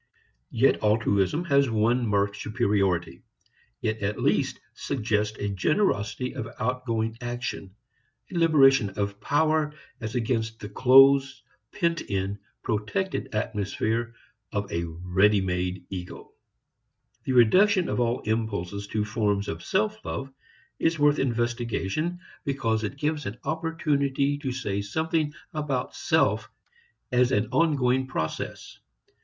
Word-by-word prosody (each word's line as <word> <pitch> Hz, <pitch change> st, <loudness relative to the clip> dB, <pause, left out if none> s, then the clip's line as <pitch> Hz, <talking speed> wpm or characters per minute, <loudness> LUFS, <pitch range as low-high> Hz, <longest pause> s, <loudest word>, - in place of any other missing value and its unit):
Yet 125 Hz, +4 st, +2 dB
altruism 105 Hz, -, +2 dB
has 140 Hz, -4 st, +3 dB
one 115 Hz, +2 st, +2 dB
marked 100 Hz, -1 st, +1 dB
superiority; 100 Hz, -6 st, 0 dB, 0.6 s
it 110 Hz, 0 st, -1 dB
at 100 Hz, +1 st, -2 dB
least -, -, +1 dB
suggests 105 Hz, -4 st, -1 dB
a 100 Hz, -, -2 dB
generosity 120 Hz, -, 0 dB
of 115 Hz, -, -5 dB
outgoing 115 Hz, -2 st, -1 dB
action, 120 Hz, -5 st, -5 dB, 0.6 s
a -, -, -7 dB
liberation 135 Hz, -9 st, +5 dB
of 100 Hz, 0 st, -2 dB
power 155 Hz, +3 st, +2 dB, 0.3 s
as 110 Hz, 0 st, -5 dB
against 115 Hz, -2 st, -1 dB
the 105 Hz, -, -7 dB
close, 135 Hz, +3 st, +5 dB, 0.3 s
pent 170 Hz, 0 st, 0 dB
in, 100 Hz, 0 st, -3 dB, 0.2 s
protected 115 Hz, -, -2 dB
atmosphere 110 Hz, +2 st, -1 dB, 0.4 s
of 100 Hz, -1 st, -3 dB
a 85 Hz, 0 st, -1 dB
ready 90 Hz, +5 st, +2 dB
made 90 Hz, -1 st, -2 dB
ego. 90 Hz, -2 st, -7 dB, 0.9 s
The 130 Hz, -, 0 dB
reduction 185 Hz, -, +5 dB
of -, -, -1 dB
all 120 Hz, 0 st, +1 dB
impulses 100 Hz, -3 st, -2 dB
to 105 Hz, +1 st, -1 dB
forms 105 Hz, -2 st, 0 dB
of 80 Hz, -, -4 dB
self 215 Hz, +2 st, 0 dB
love 135 Hz, 0 st, -5 dB, 0.5 s
is 165 Hz, +1 st, +1 dB
worth 145 Hz, 0 st, +3 dB
investigation 120 Hz, -, -1 dB, 0.2 s
because 115 Hz, -6 st, -1 dB
it 110 Hz, +6 st, -4 dB
gives 150 Hz, 0 st, -1 dB
an 100 Hz, +4 st, -5 dB
opportunity 145 Hz, -3 st, 0 dB
to 135 Hz, -3 st, -3 dB
say 105 Hz, -6 st, -2 dB
something 160 Hz, +8 st, -1 dB, 0.2 s
about 145 Hz, -5 st, -2 dB
self -, -, +1 dB, 0.6 s
as 125 Hz, 0 st, +3 dB
an 105 Hz, -1 st, +1 dB
ongoing 130 Hz, -5 st, +2 dB
process. 80 Hz, -10 st, -4 dB
120 Hz, 120 wpm, -26 LUFS, 105-140 Hz, 0.9 s, liberation